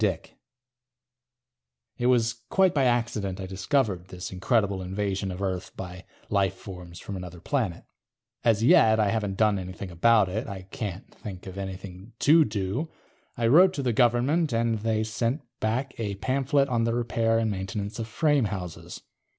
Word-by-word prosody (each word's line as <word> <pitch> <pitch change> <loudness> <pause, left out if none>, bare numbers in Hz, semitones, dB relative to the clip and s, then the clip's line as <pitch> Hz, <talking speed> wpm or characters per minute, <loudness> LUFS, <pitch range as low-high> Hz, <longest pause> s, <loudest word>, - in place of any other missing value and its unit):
DICK 95 -6 -1 1.6
It 120 - +1
was 115 -2 +2
quite 190 -2 +4
by 140 -3 +2
accident 115 -6 0
I 95 - -4
discovered 95 0 0
this 90 0 -7
incredible 100 0 +1
invasion 95 +1 -2
of 90 +2 -5
Earth 95 -2 -3
by 90 0 -7 0.2
lifeforms 95 -3 -2
from 100 - -6
another 90 -2 -7
planet. 105 -4 -2 0.6
As 115 -2 +3
yet, 110 -2 +6
I 105 -2 +3
haven't 105 -3 -1
done 105 -3 +3
anything 95 0 -7
about 105 +4 +4
it; 110 +8 -3
I 95 -2 -6
can't 95 -1 -6
think 95 -4 -9
of 95 -1 -8
anything 95 +2 -7
to 155 +6 +6
do. 105 - -2 0.5
I 120 - 0
wrote 180 +10 +6
to 140 - -2
the 125 -2 +1
Government, 125 +7 +3
and 115 -1 +1
they 110 0 0
sent 115 +6 -1 0.2
back 125 +5 -1
a 105 -3 -2
pamphlet 135 +6 +1
on 120 -3 +1
the 115 0 +1
repair 115 -1 +1
and 115 -1 +1
maintenance 100 +2 -4
of 110 - -3
frame 145 +1 +2
houses. 95 -4 -6
110 Hz, 160 wpm, -27 LUFS, 95-120 Hz, 1.6 s, yet